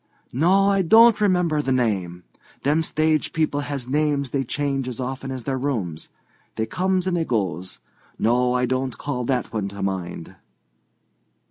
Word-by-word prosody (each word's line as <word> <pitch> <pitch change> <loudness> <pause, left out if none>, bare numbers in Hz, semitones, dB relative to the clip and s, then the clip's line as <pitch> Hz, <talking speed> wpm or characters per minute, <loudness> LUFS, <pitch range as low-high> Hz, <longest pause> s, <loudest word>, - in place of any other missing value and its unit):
"No, 180 +9 +4
I 195 -1 +3
don't 220 +4 +6
remember 180 -6 +2
the 135 - -2
name. 95 -9 -1 0.4
Them 150 +4 +2
stage 155 -1 0
people 155 -3 0
has 140 -3 -4
names 145 -1 0
they 135 -1 0
change 135 0 -2
as 125 -2 -5
often 130 +1 -4
as 130 -2 -5
their 130 +1 -2
rooms. 105 - -3 0.5
They 110 - -1
comes 185 +8 0
and 185 -1 0
they 170 - +1
goes. 95 - -2 0.4
No, 125 +2 +2
I 125 0 +2
don't 130 0 -2
call 125 -4 -3
that 125 -2 -1
one 105 -3 -1
to 100 0 -6
mind." 90 -3 -4
135 Hz, 160 wpm, -23 LUFS, 115-155 Hz, 0.5 s, don't